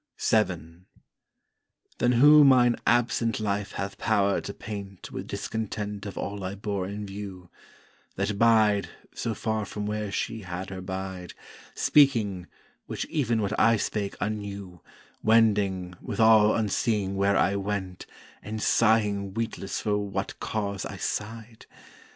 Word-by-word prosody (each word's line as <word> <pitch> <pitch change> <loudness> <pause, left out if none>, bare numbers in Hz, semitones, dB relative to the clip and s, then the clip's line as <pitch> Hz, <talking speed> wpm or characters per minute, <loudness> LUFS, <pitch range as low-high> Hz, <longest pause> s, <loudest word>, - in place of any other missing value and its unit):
VII 90 -5 0 1.1
Then 120 0 +3
who 145 +5 +8
mine 125 -3 +5
absent 115 -1 +2
Life 100 -1 -2
hath 100 0 -5
power 100 -2 +2
to - - -6
paint 100 -2 -8
Wi' - - -4
discontent 105 -1 -4
of 100 - -8
all 100 -1 -4
I 95 +1 -4
bore 100 -2 -3
in 105 +1 -5
view; 95 -3 -8 0.6
That 105 -1 -2
Bide, 110 -3 +4 0.2
so 115 - -3
far 110 +1 -1
from 105 +1 -5
where 105 -1 -3
she 115 +2 -3
had 95 0 -6
her 95 -1 -6
Bide, 95 -1 -6 0.4
Speaking, 110 -11 +3 0.4
which - - -4
even 120 -7 +1
what 100 +1 -1
I 115 0 +5
spake 100 -1 -2
unknew, 100 -4 -5 0.4
Wending, 100 -5 +2
withal 110 -1 +4
unseeing 105 -2 0
where 100 +1 +2
I 100 - +2
went, 100 -2 -4 0.3
And 110 +1 -5
sighing 105 -4 +2
weetless 115 -4 -3
for 105 -1 0
what 100 -1 -4
cause 100 -2 -3
I - - -6
sigh'd? 110 +1 -5
105 Hz, 135 wpm, -27 LUFS, 100-110 Hz, 1.1 s, who